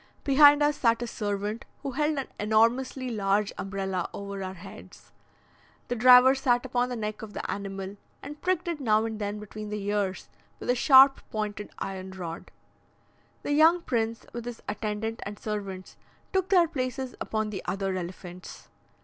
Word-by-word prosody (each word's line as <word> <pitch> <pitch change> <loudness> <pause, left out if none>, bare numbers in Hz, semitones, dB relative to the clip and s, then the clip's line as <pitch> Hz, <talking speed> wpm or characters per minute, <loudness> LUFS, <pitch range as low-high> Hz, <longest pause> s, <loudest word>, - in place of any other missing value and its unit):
Behind 290 +1 +7
us 295 0 +2
sat 230 -1 +2
a - - -2
servant, 210 0 -3 0.2
who 275 - -3
held 300 +3 0
an 270 - -1
enormously 235 +5 +2
large 205 -1 0
umbrella 190 -2 -3
over 200 -1 -6
our 185 0 -5
heads. 185 +3 -13 0.8
The 245 - 0
driver 250 +2 +8
sat 255 -2 +1
upon 250 -1 0
the 250 - -3
neck 215 -2 -4
of 215 -2 -9
the - - -4
animal, 195 0 -5 0.3
and 295 +2 -9
pricked 365 -1 0
it 335 -3 -2
now 220 -4 +2
and 220 -1 -4
then 205 0 -3
between 210 0 -8
the 210 0 -3
ears 200 -2 -1 0.3
with - - 0
a - - +1
sharp 270 +1 +7
pointed 210 -1 -4
iron 190 -1 -5
rod. 170 -3 -7 0.9
The - - -2
young 320 +4 +5
prince, 230 -2 -1
with 235 0 -6
his 245 -1 -7
attendant 215 +2 -3
and 205 +1 -7
servants, 195 -4 -6 0.4
took 380 -1 +1
their 355 -3 +5
places 260 -3 -3
upon 215 -1 -2
the 195 - -5
other 195 -1 -2
elephants. 180 0 -8
220 Hz, 165 wpm, -27 LUFS, 200-260 Hz, 0.9 s, driver